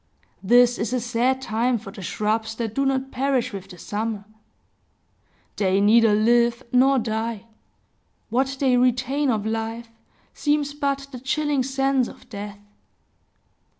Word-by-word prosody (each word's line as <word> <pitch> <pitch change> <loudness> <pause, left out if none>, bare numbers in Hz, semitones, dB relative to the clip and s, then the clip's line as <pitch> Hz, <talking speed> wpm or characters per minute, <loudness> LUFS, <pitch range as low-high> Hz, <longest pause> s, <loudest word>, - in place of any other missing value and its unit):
This 245 +4 +4
is 230 +2 -2
a 250 - +1
sad 245 +2 0
time 235 +2 0
for 210 -2 -10
the 200 -1 -10
shrubs 220 +4 -2
that 225 -2 -3
do 275 +3 +1
not 270 0 -1
perish 260 -3 0
with 195 -1 -7
the 180 - -11
summer; 210 +2 -4 1.3
they 195 -1 +2
neither 215 +1 +5
live 235 +3 +3
nor 265 +2 +4
die; 225 -1 -2 0.9
what 265 +3 0
they 260 -3 +3
retain 255 +3 +1
of 215 -3 0
life 225 +1 -3 0.4
seems 290 -1 0
but 275 -1 -2
the 250 - -7
chilling 290 +2 0
sense 270 -1 +1
of - - -13
death. 205 -1 -7
240 Hz, 140 wpm, -23 LUFS, 220-265 Hz, 1.3 s, neither